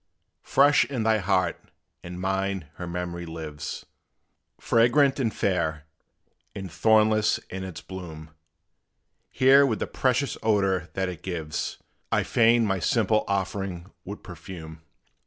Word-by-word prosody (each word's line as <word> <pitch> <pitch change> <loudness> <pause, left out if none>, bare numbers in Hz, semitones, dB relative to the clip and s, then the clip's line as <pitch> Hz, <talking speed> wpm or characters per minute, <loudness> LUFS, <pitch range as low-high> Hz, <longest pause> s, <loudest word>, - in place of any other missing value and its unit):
Fresh 145 +2 +4
in 130 -5 -3
thy 110 -1 +3
heart 90 -1 +1 0.4
and 90 +1 -8
mine 95 -1 -1
her 90 - -6
memory 85 0 -4
lives, 75 -3 -6 0.7
Fragrant 130 +5 +3
and 115 -4 +1
fair, 80 -8 -1 0.7
and 95 -3 -6
thornless 110 +4 +3
in 95 0 -5
its 95 -3 -7
bloom: 80 -4 -9 1.0
Here 135 +2 +6
with 120 -6 +1
the - - -2
precious 130 +1 0
odor 95 -5 +1
that 95 0 -1
it 90 -3 -6
gives, 80 -5 -4 0.3
I - - +2
fain 115 0 +4
my 95 -2 0
simple 110 +2 +1
offering 95 -2 -3
would 100 +2 -8
perfume. 80 -2 -10
95 Hz, 125 wpm, -26 LUFS, 85-110 Hz, 1.0 s, Here